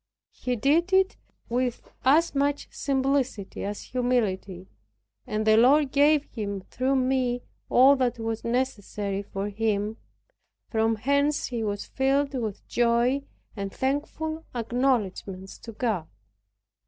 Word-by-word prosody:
He 250 -1 -3
did 310 - +2
it 380 0 +4 0.3
with 245 0 -1 0.2
as 300 +6 +4
much 285 +1 0
simplicity 265 -6 -1
as 205 +1 -4
humility, 205 -7 -1 0.6
and 215 0 -1
the 220 0 +5
Lord 270 +4 +5
gave 290 +1 +4
him 200 -7 -5
through 260 +7 -1
me 255 -2 +1 0.3
all 265 +3 +7
that 250 -2 0
was 225 -1 -3
necessary 210 -5 -2
for 195 0 -4
him, 210 0 -1 0.7
from 225 0 +2
whence 285 +1 +2
he 235 -3 -3
was 205 -1 -2
filled 275 +1 +1
with 225 -6 -4
joy, 240 +3 +2 0.3
and 200 -2 -4
thankful 315 +5 -2
acknowledgments 225 -6 -1
to 230 - -9
God. 215 -8 -2
245 Hz, 120 wpm, -26 LUFS, 215-275 Hz, 0.7 s, all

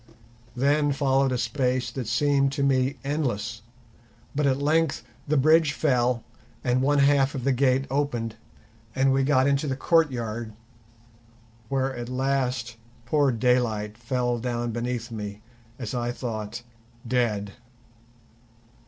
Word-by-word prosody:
Then 145 +3 +2
followed 135 -1 +2
a 125 - 0
space 130 0 -1
that 130 -5 -5
seemed 140 +3 +2
to 140 - -1
me 135 0 +2
endless, 120 -6 -2 0.7
but 145 0 +1
at 130 -1 +2
length 155 -1 +1 0.2
the 150 +1 +2
bridge 155 +2 +4
fell 125 -6 +1 0.4
and 125 0 +1
one 145 +2 +2
half 140 0 +3
of 130 - -4
the 135 - +2
gate 130 +1 +2
opened 120 -6 -1 0.6
and 135 0 +3
we 135 - +2
got 130 -1 +3
into 140 +1 +1
the 135 - -1
courtyard, 120 -8 0 1.2
where 135 -1 0
at 120 0 -6
last 125 -2 -1 0.3
poor 140 +2 +2
Daylight 115 -3 +1
fell 120 0 -1
down 120 0 -2
beneath 120 0 -3
me, 105 -1 -6 0.3
as 120 -6 -5
I 120 -1 -1
thought, 115 -2 -5 0.4
dead. 110 -5 0
130 Hz, 130 wpm, -26 LUFS, 120-140 Hz, 1.2 s, bridge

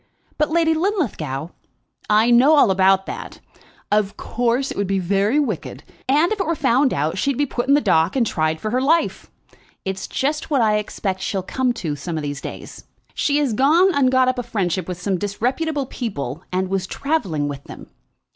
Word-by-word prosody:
"But, 300 - +2
Lady 325 0 +2
Linlithgow 255 - -2 0.3
" - - -48 0.2
"I 215 +3 +4
know 260 +6 +6
all 280 -9 +5
about 190 0 +3
that. - - -7 0.5
Of 210 -1 +1
course, 245 +3 -1
it - - -6
would 200 -1 -1
be 195 0 0
very 200 +8 +1
wicked, 225 - -3 0.3
and 300 +7 +3
if 430 - -1
it 385 - -1
were 335 - +1
found 265 -1 +2
out 155 +6 -1
she'd 275 +2 0
be 290 - +2
put 245 -2 -3
in 280 - +5
the 295 - +3
dock 160 - +2
and 250 -3 +2
tried 155 -5 -1
for 215 - -3
her 250 +2 +1
life. 325 +5 +1 0.6
It 190 0 -2
is - - -6
just 300 +4 -2
what 285 -3 +2
I 210 -1 +3
expect 195 -2 -3
she'll 190 -1 -2
come 255 +6 0
to 165 -10 -4
some 160 +3 -5
of 155 - -3
these 145 -1 -4
days. - - -9 0.3
She 290 -1 +1
has 285 -6 +1
gone 320 - +4
and 265 -4 +3
got 260 -1 +4
up 255 0 0
a - - 0
friendship 195 -7 -2
with 180 -1 -5
some 185 0 -1
disreputable 265 - -1
people, 165 - -5
and 185 +1 0
was 190 0 -2
travelling 190 - -1
with 140 -1 -6
them. - - -10
225 Hz, 205 wpm, -21 LUFS, 185-280 Hz, 0.6 s, know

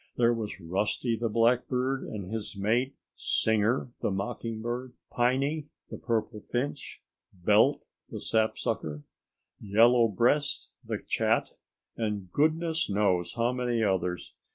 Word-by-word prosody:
There 120 0 +4
were 115 -2 -2
Rusty 105 +7 0
the 115 +1 -1
Blackbird 125 +3 +2
and 100 -3 -6
his 110 -2 -4
mate, 120 +7 +1 0.2
Singer 110 +3 +1
the - - +1
Mocking 105 +3 -3
Bird, 120 +2 -4 0.2
Piney 135 +5 +1 0.2
the - - -6
Purple 110 -2 -2
Finch, 135 +3 -3 0.3
Belt 105 +9 +3 0.3
the - - -6
Sapsucker, 80 -9 -1 0.6
Yellow 115 +3 +5
Breast 125 +8 +1
the - - -3
Chat, - - +1 0.4
and 105 -5 -3
goodness 160 - +1
knows 95 -4 +1
how 120 +1 +2
many 120 -2 0
others! 90 -3 -1
115 Hz, 120 wpm, -29 LUFS, 105-125 Hz, 0.6 s, Yellow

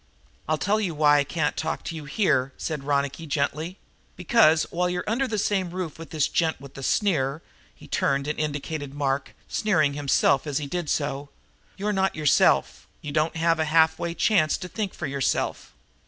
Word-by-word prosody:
"I'll 155 - +2
tell 210 +6 +1
you 180 -6 -2
why 145 -1 +5
I - - +3
can't 150 0 -1
talk - - -3
to 165 - -5
you 155 -2 -7
in - - -11
here," 140 -7 +1
said 155 -4 -4
Ronicky 140 +2 -1
gently. 150 +5 -2 0.4
"Because, 170 -4 +4
while 180 +1 0
you're 180 0 -2
under 245 +5 0
the 220 - -2
same 195 -3 0
roof 175 -3 -5
with 165 -3 -9
this 155 -3 +1
gent 160 -2 0
with 140 0 -12
the 135 - -9
sneer" 150 -3 0 0.3
he - - -15
turned 140 0 0
and 150 - -2
indicated 145 -1 -3
Mark, 140 -1 -2
sneering 155 -10 +1
himself 140 0 +2
as 145 -2 -1
he 150 - -2
did 170 +1 -3
so 140 -1 -2 0.5
"you're 210 +2 -1
not 190 -1 +1
yourself. 150 -2 +2 0.2
You 150 - -5
don't 155 +3 0
have 165 0 +2
a 160 - +2
halfway 160 +2 +2
chance 175 -8 +2
to 180 - -7
think 200 +2 -4
for - - -4
yourself. 140 -1 -1
155 Hz, 190 wpm, -25 LUFS, 145-180 Hz, 0.5 s, why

